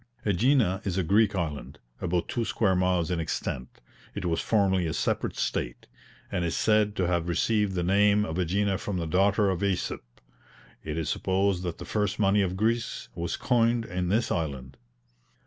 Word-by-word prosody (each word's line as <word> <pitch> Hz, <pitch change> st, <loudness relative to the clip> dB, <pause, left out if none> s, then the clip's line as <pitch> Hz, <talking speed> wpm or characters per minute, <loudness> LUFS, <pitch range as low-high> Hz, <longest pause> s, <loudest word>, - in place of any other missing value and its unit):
AEgina 105 Hz, -1 st, +2 dB
is 95 Hz, -2 st, -2 dB
a 95 Hz, -, +1 dB
Greek 100 Hz, +4 st, +3 dB
island, 80 Hz, -6 st, -4 dB, 0.2 s
about 90 Hz, -1 st, -1 dB
two 120 Hz, -, -1 dB
square 100 Hz, -4 st, +1 dB
miles 90 Hz, -2 st, +1 dB
in 85 Hz, -, 0 dB
extent, 65 Hz, -5 st, -4 dB, 0.4 s
it 100 Hz, -3 st, -4 dB
was 80 Hz, -1 st, 0 dB
formerly 95 Hz, -5 st, +2 dB
a 80 Hz, -, -2 dB
separate -, -, -1 dB
state, -, -, -2 dB, 0.5 s
and 90 Hz, -, -1 dB
is 85 Hz, -, -1 dB
said 105 Hz, -1 st, +2 dB
to 95 Hz, -, 0 dB
have 85 Hz, -1 st, 0 dB
received 105 Hz, +3 st, +1 dB
the 90 Hz, -, 0 dB
name 100 Hz, +3 st, +3 dB
of 80 Hz, +1 st, -4 dB
AEgina 95 Hz, +2 st, 0 dB
from 100 Hz, -3 st, -3 dB
the 85 Hz, -, -2 dB
daughter 100 Hz, +4 st, +2 dB
of 95 Hz, 0 st, -3 dB
AEsop. 100 Hz, -3 st, -1 dB, 0.8 s
It 75 Hz, 0 st, -4 dB
is 80 Hz, -2 st, -2 dB
supposed 95 Hz, +2 st, 0 dB
that 85 Hz, -2 st, -4 dB
the -, -, -8 dB
first 105 Hz, -2 st, -1 dB
money 100 Hz, -1 st, +3 dB
of 95 Hz, -1 st, -1 dB
Greece 115 Hz, +3 st, -1 dB
was 85 Hz, 0 st, -3 dB
coined 120 Hz, -1 st, +2 dB
in 90 Hz, -1 st, -2 dB
this 110 Hz, +4 st, +1 dB
island. 70 Hz, -5 st, -3 dB
95 Hz, 180 wpm, -27 LUFS, 85-105 Hz, 0.8 s, Greek